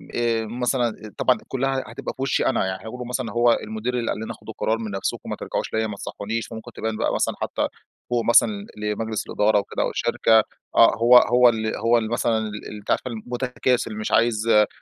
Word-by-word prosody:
آآ 115 -1 +1
مثلًا 120 -2 -2
طبعاً 130 - +3
كلها 135 0 -1
هتبقى - - -6
في - - -10
وشّي 135 - +1
أنا، 130 - +1
يعني 95 0 -3
حيقولوا 125 +3 -7
مثلًا 125 -2 -3
هو 120 +1 +4
المدير 110 +3 -4
اللي 115 - -1
قال - - -3
لنا 110 - -5
خدوا - - -10
القرار 110 - 0
من 110 -2 -5
نفْسكم 95 -1 -3
ما - - -2
ترجعوش - - -4
ليَّ، 110 0 +1
ما 105 - -5
تصحّونيش، 110 +3 -4
فممكن 115 +1 -9
تبان 110 0 -3
بقى - - 0
مثلًا - - 0
حتى - - -1 0.4
فوق 120 -1 0
مثلًا 200 - +4
لمجلس 105 +1 -3
الإدارة 105 0 +2
وكده 100 - -2
وشركة، 110 -1 +3 0.3
آه - - +6
هو 120 +2 +7
هو 125 0 +6
اللي 110 -1 -1
هو 115 +2 +3
اللي 110 -2 -1
مثلًا 115 -1 +1
ال 105 0 -7
أنتِ 105 - -5
عارفة - - 0
المتكاسل 125 0 -1
مش 110 - -3
عايز 115 -1 +2
آآ، 105 -2 +5
115 Hz, 200 wpm, -23 LUFS, 110-120 Hz, 0.4 s, هو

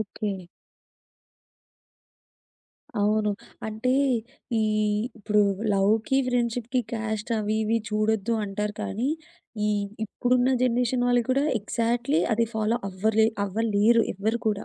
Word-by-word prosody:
Okay. 200 -2 -4 2.6
అవును. 210 +1 +2 0.4
అంటే 220 +4 -1 0.7
ఈ - - +2 0.6
ఇప్పుడు 210 0 +2 0.3
లవ్‌కి 215 +6 +2
ఫ్రెండ్‌షిప్‌‌కి 245 0 0
క్యాస్ట్ 220 -1 -3
అవి 215 0 -1
ఇవి 225 +2 +1
చూడొద్దు 215 +1 +1
అంటారు 210 +1 -3
కానీ, 235 +7 -2 0.6
ఈ - - +2 0.4
ఇప్పుడున్న 245 +4 +1
జనరేషన్ 245 0 +1
వాళ్ళు 245 -1 +3
కూడా 275 +3 +2
ఎక్జాక్ట్‌లీ 235 +7 0
అది 230 +1 +2
ఫాలో 220 +1 +1
అవ్వరే 215 +3 +2 0.2
అవ్వలేరు 220 +2 +3
ఎవ్వరు 215 +4 -1
కూడా. 205 -1 0
220 Hz, 100 wpm, -26 LUFS, 210-235 Hz, 2.6 s, వాళ్ళు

